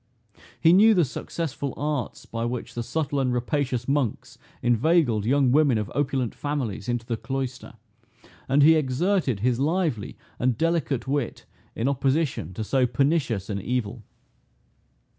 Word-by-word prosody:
He 165 - +5
knew 215 +4 +6
the 175 -4 +4
successful 140 0 -4
arts 145 -3 -3
by 115 0 -4
which 120 0 -4
the 120 - -3
subtle 145 +3 -2
and 130 -2 +1
rapacious 125 0 -1
monks 135 -5 -1 0.2
inveigled 120 - +2
young 135 0 +3
women 140 -4 +4
of 105 -1 -3
opulent 130 -4 -1
families 125 -8 -3
into 120 -1 -1
the 115 -1 -2
cloister; 130 0 -5 0.8
and 140 +2 +4
he 160 +2 +8
exerted 150 - +1
his 120 +1 +1
lively 155 - -1 0.2
and 125 -1 +1
delicate 160 -6 0
wit 140 -3 -2 0.3
in 115 - -1
opposition 140 - 0
to 110 - -3
so 130 +3 +2
pernicious 125 - 0
an 100 -2 -3
evil. 120 -1 -2
130 Hz, 140 wpm, -25 LUFS, 120-150 Hz, 0.8 s, he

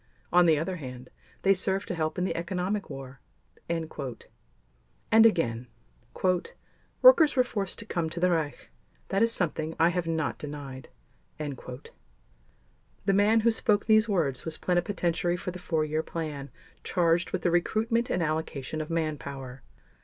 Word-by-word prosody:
On 175 0 +6
the 160 -2 +5
other 180 +4 -2
hand, 125 -4 -9 0.3
they 195 - +6
served 195 +1 0
to - - -1
help 155 -1 -2
in 180 - 0
the - - -2
economic 185 +4 -2
war." 135 -2 -8 0.5
And 165 -1 -1 1.3
again: 165 - +4 1.4
"Workers 405 -13 +8
were 255 - +5
forced 200 -6 -3
to 225 - -6
come 170 -6 -2
to 170 - -6
the 180 +1 +3
Reich. 155 -4 -2 0.4
That 195 +1 +1
is 230 0 +4
something 160 -5 -1
I 165 - +5
have 175 -1 -2
not 160 -2 -1
denied." 140 -3 -7 0.5
The 140 -3 -7 1.3
man 210 +3 +4
who 230 +1 +4
spoke 210 -2 +1
these 220 0 +4
words 155 -10 0
was 160 -1 -4
Plenipotentiary 175 -1 0
for 180 - -4
the 180 - -8
Four 160 -3 0
Year 155 +1 -1
Plan 150 -4 -5 0.3
charged 170 -1 +2
with - - -3
the 175 - +2
recruitment 225 +7 +1
and 175 - 0
allocation 155 -2 -3
of 155 - -6
manpower. 140 -5 -4
170 Hz, 150 wpm, -28 LUFS, 155-195 Hz, 1.4 s, Workers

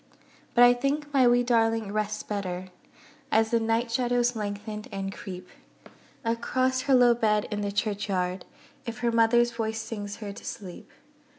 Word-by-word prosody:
But 245 - +7
I 245 0 +8
think 285 +4 -2
my 260 -3 +5
wee 245 0 +4
darling 225 -3 +1
rests 215 0 -2
better 185 -3 -4 0.6
As 220 0 +3
the 235 - +3
night 225 +1 0
shadows 245 0 +1
lengthen, 210 0 -5
and 195 0 -4
creep 180 -2 -8 0.8
Across 255 +3 0
her 270 - +6
low 245 -1 +6
bed, 215 -3 +1
in 210 0 -2
the 205 0 -2
churchyard, 195 -3 -1 0.4
If 230 -1 -5
her 240 -1 +1
mother's 235 +1 +4
voice 225 -1 -3
sings 205 -2 -5
her 205 -2 -7
to - - -12
sleep. 185 -5 -8
225 Hz, 160 wpm, -27 LUFS, 205-240 Hz, 0.8 s, I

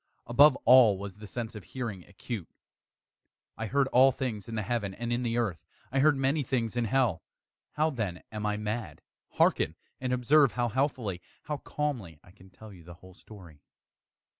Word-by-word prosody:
Above 140 +4 +6
all 120 -6 +7
was 100 0 -8
the 105 0 -10
sense 115 +2 -5
of 105 -3 -9
hearing 110 -5 -6
acute. 100 -1 -7 1.1
I 110 - -4
heard 140 +3 +2
all 130 +2 +6
things 115 -6 -4
in 115 - -5
the 110 - -1
heaven 105 -3 -2
and 120 0 -3
in 120 - -1
the 120 -1 -1
earth. 100 -9 -1 0.3
I 135 - +1
heard 145 +1 +4
many 135 +3 +1
things 120 -3 -2
in 120 -1 0
hell. 115 -7 +1 0.5
How, 155 +1 +1
then, 105 - -4
am 105 -1 -5
I 105 0 -1
mad? 105 +2 -5 0.3
Hearken! - - +2 0.2
and 130 -1 -3
observe 125 +1 +4
how 120 +1 0
healthily 120 -8 -1 0.2
how 150 - -3
calmly 125 - -4
I 90 - -18
can 95 0 -18
tell 105 +2 -13
you 90 -3 -14
the 85 +1 -12
whole 95 +2 -16
story. 90 -7 -15
115 Hz, 185 wpm, -29 LUFS, 100-130 Hz, 1.1 s, all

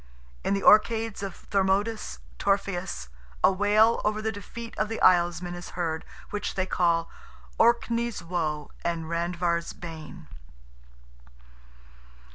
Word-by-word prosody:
In 200 - +1
"the 195 - -2
Orcades" 225 0 +4
of 195 -3 -7
Thormodus 200 - +1 0.2
Torfaeus, 190 - -1 0.3
a - - +7
wail 210 +4 +4
over 210 0 +1
the 220 +1 -1
defeat 225 +3 -8
of 215 - +1
the 225 - -3
Islesmen 175 -1 +3
is 175 0 -7
heard, 160 -2 -2 0.3
which 210 - -3
they 185 - 0
call 170 -2 +1 0.5
"Orkney's 235 -2 +2
woe 160 -4 -2
and 170 -1 -1
Randver's 170 0 -1
bane." 165 0 -9
185 Hz, 115 wpm, -27 LUFS, 170-210 Hz, 0.5 s, a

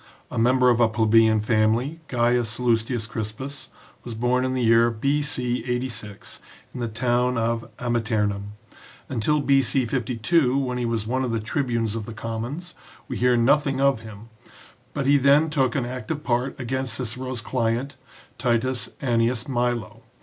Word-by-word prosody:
A - - -2
member 125 +2 +4
of 120 - +1
a 120 - +5
plebeian 110 0 +4
family, 115 +8 +1
Gaius 120 -1 +1
Sallustius 115 -1 0
Crispus 130 +6 -6 0.4
was 120 -2 -7
born 125 +3 +1
in 130 0 -1
the 125 - 0
year 115 +1 +5
B.C. 125 0 -1
86 125 -5 -5 0.3
in 125 - -7
the 120 - -1
town 125 +2 0
of 115 0 -1
Amiternum. 110 -4 -1 0.6
Until 135 +5 +1
B.C. 135 -2 +2
52, 125 +4 +1
when 125 -2 -1
he 120 - -1
was 115 -2 -1
one 130 +4 -1
of 125 - -1
the 115 - 0
tribunes 115 -2 -1
of 110 -2 -5
the 115 - -7
commons, 120 +10 -5 0.3
we 130 - -4
hear 125 0 +3
nothing 135 +3 +2
of 135 -3 +3
him, 110 0 -11 0.7
but 140 -2 -1
he 140 +1 +5
then 145 +4 +4
took 135 -5 +1
an 130 - 0
active 130 +5 -5
part 125 -1 -1
against 130 -1 -2
Cicero's 125 +1 -4
client, 120 +3 -1 0.4
T. 125 - 0 0.5
Annius 120 -1 +1
Milo. 120 -3 -2
120 Hz, 155 wpm, -24 LUFS, 115-130 Hz, 0.7 s, a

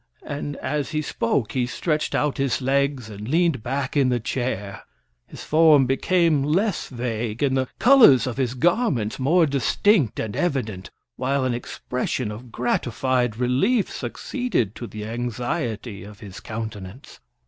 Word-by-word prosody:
And 145 0 -4
as 145 -1 -3
he 155 -1 -2
spoke 115 -4 -1
he 125 -2 0
stretched 150 +4 -1
out 150 -2 0
his 135 -2 +1
legs, 135 -2 0
and 105 0 -8
leaned 165 -3 +2
back 130 +4 -3
in 135 -3 +3
the 125 -1 +1
chair. 110 -4 -3 0.5
His - - -10
form 155 -3 +5
became 160 +3 +2
less 180 +7 0
vague, 120 -2 -3
and 135 -2 +2
the 130 -1 0
colors 240 - +7
of 130 -2 -4
his 130 -2 -1
garments 165 - +1
more 160 +6 +4
distinct 140 - +2
and 105 -2 -3
evident, 115 - -2 0.3
while 135 +1 0
an 125 - 0
expression 125 -1 -3
of 115 +3 -10
gratified 120 0 0
relief 135 - +1
succeeded 245 - -2
to 120 - -7
the 105 -1 -7
anxiety 120 - -3
of 100 0 -12
his 100 -2 -10
countenance. 110 0 -7
130 Hz, 150 wpm, -23 LUFS, 115-150 Hz, 0.5 s, colors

